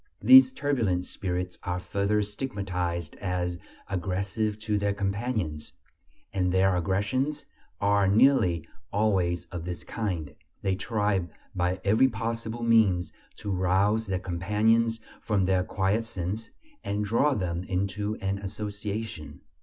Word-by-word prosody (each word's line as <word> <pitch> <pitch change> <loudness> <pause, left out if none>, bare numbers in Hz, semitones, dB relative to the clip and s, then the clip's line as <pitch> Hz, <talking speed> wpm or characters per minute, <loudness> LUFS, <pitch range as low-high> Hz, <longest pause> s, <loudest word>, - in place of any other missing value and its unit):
These 265 0 +9
turbulent 115 - 0
spirits 90 -1 -3
are 90 0 -2
further 100 +3 0
stigmatized 95 - -3
as 90 -2 -2 0.3
"aggressive 100 +3 -1
to 105 -1 -1
their 100 0 0
companions," 100 -6 -2 0.6
and 90 -2 +1
their 95 0 +3
aggressions 105 - 0 0.3
are 100 -1 +3
nearly 95 - +4 0.2
always 95 -5 +1
of 90 -3 -5
this 85 -2 -5
kind: 85 -10 -3 0.3
they 95 - +1
try 105 -3 0 0.3
by 90 +1 0
every 110 +6 +5
possible 115 0 -3
means 110 -6 +3 0.2
to 105 -2 -5
rouse 95 +4 +2
their 95 -1 0
companions 105 +6 +1 0.2
from 100 -4 +1
their 95 -1 +2
quiescence, 105 +1 -2 0.3
and 105 +1 -1
draw 130 +7 +2
them 90 -4 -2
into 100 +3 -1
an 100 0 -1
association. 105 -5 -5
100 Hz, 120 wpm, -27 LUFS, 90-110 Hz, 0.6 s, These